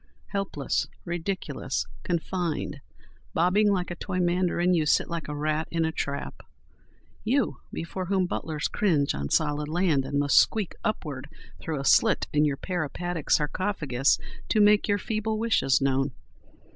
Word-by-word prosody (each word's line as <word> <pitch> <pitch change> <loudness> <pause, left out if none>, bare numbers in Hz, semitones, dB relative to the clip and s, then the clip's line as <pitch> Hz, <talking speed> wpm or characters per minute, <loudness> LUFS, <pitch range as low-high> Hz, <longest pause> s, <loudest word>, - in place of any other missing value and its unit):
Helpless, 195 -8 -1 0.2
ridiculous, 175 +2 -3 0.2
confined, 170 -4 -2 0.6
bobbing 185 +5 +4
like 180 -2 -1
a - - -3
toy 185 +1 -4
mandarin, 180 0 +2
you 165 -3 +3
sit - - +3
like 170 -1 -3
a 150 - -4
rat 155 +1 -1
in 165 -1 0
a 160 - 0
trap—you, 185 - -4
before 180 +3 -4
whom 190 -1 +2
butlers 155 -3 -2
cringe 155 -9 +1
on 70 0 -3
solid 150 -1 +1
land—and 155 -5 +1
must 145 0 +5
squeak 210 -5 +1
upward 145 -10 -3 0.3
through 155 -3 -3
a 135 - -4
slit - - +4
in 150 0 +4
your 140 -2 0
peripatetic 175 -1 -3
sarcophagus 150 -5 +2 0.3
to 215 - +3
make 210 0 +5
your 205 -1 +2
feeble 215 +1 -2
wishes 220 -11 +2
known. 135 0 +1
170 Hz, 140 wpm, -27 LUFS, 145-190 Hz, 0.6 s, must